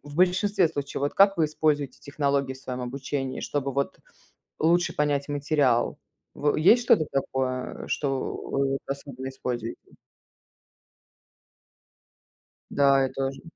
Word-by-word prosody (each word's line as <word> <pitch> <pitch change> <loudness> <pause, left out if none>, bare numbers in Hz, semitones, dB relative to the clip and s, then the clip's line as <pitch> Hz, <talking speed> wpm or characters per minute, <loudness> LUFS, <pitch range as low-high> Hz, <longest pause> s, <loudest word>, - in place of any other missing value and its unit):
в 145 0 -11
большинстве 185 0 +3
случаев, 145 -4 -4
вот 145 +1 -1
как 195 -1 +5
вы 160 - +4
используете 150 -2 0
технологии 140 -2 -1
в - - -13
своем 125 -1 -5
обучении, 135 +1 -4
чтобы 140 -2 -2
вот 140 +1 -2 0.6
лучше 170 +2 +3
понять 145 -1 0
материал? 145 -4 +1 0.4
В 145 0 +1
есть 225 +10 +5
что-то 165 -9 +4
такое, 130 -1 -2
а, - - -11
что 135 -2 -1
вы 135 0 -1
особенно 135 -1 -6
используете? 120 -3 -5 2.8
Да, 140 -1 +4
я 130 - 0
тоже. 135 0 -3
140 Hz, 125 wpm, -26 LUFS, 135-150 Hz, 2.8 s, как